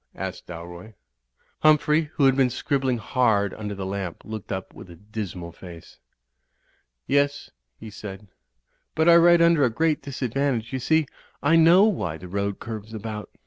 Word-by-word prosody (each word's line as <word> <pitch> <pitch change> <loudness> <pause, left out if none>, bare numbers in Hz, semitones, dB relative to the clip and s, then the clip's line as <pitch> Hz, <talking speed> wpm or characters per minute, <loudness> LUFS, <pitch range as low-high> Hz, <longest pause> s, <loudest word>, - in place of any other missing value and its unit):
asked - - -6
Dalroy. 85 +5 -10 0.6
Humphrey, 155 0 +3
who 140 - +3
had 135 -1 +5
been 135 -2 +3
scribbling 130 0 -1
hard 110 -4 +1
under 105 -1 -6
the 95 -1 -5
lamp, 95 -2 -5
looked 110 -2 -7
up 95 -1 -5
with - - -12
a 85 - -11
dismal 95 -3 -7
face. 85 -1 -13 1.1
"Yes," 145 +1 0 0.3
he 110 - -9
said. 105 -1 -9 0.7
"But 160 +1 +2
I 170 - +8
write 170 0 +6
under 170 -3 +4
a 125 - +4
great 155 +6 0
disad 130 -4 -5
vantage. 135 -4 -1
You 130 - -1
see, 160 +4 +2 0.4
I 165 - +4
know 165 +4 +6
why 125 - 0
the 90 - -10
road 100 +2 -2
curves 110 -1 -7
about." 110 0 -6
115 Hz, 165 wpm, -24 LUFS, 100-145 Hz, 1.1 s, I